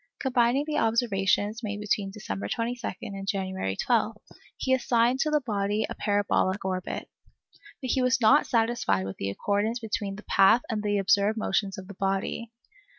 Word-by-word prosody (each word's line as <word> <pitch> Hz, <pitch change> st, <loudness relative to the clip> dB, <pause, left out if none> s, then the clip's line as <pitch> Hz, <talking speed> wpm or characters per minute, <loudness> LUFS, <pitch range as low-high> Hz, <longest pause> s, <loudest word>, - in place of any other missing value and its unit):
Combining 255 Hz, +1 st, +2 dB
the 305 Hz, -1 st, -1 dB
observations 220 Hz, -1 st, +1 dB
made 205 Hz, -2 st, -4 dB
between 210 Hz, -1 st, -1 dB
December 100 Hz, -, -5 dB
22 235 Hz, -, -2 dB, 0.2 s
and 195 Hz, -1 st, -6 dB
January 190 Hz, -, -2 dB
12, 225 Hz, -, +1 dB, 0.4 s
he 260 Hz, -, +1 dB
assigned 245 Hz, 0 st, +2 dB
to 305 Hz, -, +1 dB
the 300 Hz, -1 st, +2 dB
body 210 Hz, -2 st, -1 dB
a -, -, -5 dB
parabolic 205 Hz, -1 st, 0 dB
orbit. 185 Hz, -1 st, -3 dB, 0.8 s
But 255 Hz, -, -1 dB
he 260 Hz, -, +2 dB
was 255 Hz, +1 st, +2 dB
not 260 Hz, +6 st, +5 dB
satisfied 230 Hz, -, +1 dB
with 95 Hz, -, -6 dB
the 100 Hz, -, -2 dB
accordance 205 Hz, -, -1 dB
between 210 Hz, -4 st, -3 dB
this 210 Hz, -, -11 dB
path 200 Hz, +5 st, +5 dB
and 215 Hz, -1 st, -1 dB
the 205 Hz, -1 st, 0 dB
observed 200 Hz, +2 st, +2 dB
motions 195 Hz, -2 st, -1 dB
of 190 Hz, -1 st, -8 dB
the 200 Hz, -, -9 dB
body. 195 Hz, +4 st, -2 dB
210 Hz, 165 wpm, -27 LUFS, 195-235 Hz, 0.8 s, not